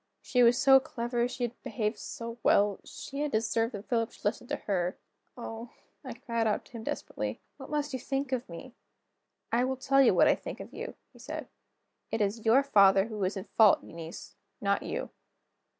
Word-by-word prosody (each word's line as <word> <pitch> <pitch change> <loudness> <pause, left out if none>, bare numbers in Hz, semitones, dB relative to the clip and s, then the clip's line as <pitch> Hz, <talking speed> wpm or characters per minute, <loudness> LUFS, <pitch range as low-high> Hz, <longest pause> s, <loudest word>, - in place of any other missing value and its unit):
She 250 - +2
was 240 0 +6
so 270 +1 +7
clever, 240 -2 -2
she 250 0 -5
had 240 0 -4
behaved 215 -2 -2
so 230 0 -7
well, 200 -1 +3
she 275 - -8
had 295 0 -1
deserved 225 +1 0
that 205 +1 -8
Philip 230 -2 0
should - - -17
listen 230 +3 -1
to - - -1
her. 180 -3 -2 0.4
"Oh," 230 0 -7 0.3
I 260 -3 -6
cried 230 -3 -1
out 210 - 0
to - - -20
him 230 -2 -7
desperately, - - -4 0.2
"what - - -10
must 295 -1 -2
you 260 - -2
think 270 +2 -2
of 250 -5 -2
me?" 170 +9 -9 0.8
"I 235 +2 +3
will 260 +1 -1
tell 275 +1 +3
you 265 - +5
what - - +6
I - - +6
think - - -7
of - - -9
you," - - -6 0.2
he - - -17
said. - - -6 0.6
"It 225 - -2
is 215 +2 -1
your 255 +5 +6
father 195 -7 +5
who 210 -3 -3
is 185 +2 -1
in 190 - -5
fault, 215 -3 +6
Eunice 165 0 -9 0.2
not 200 0 +1
you. - - -4
230 Hz, 200 wpm, -30 LUFS, 210-255 Hz, 0.8 s, so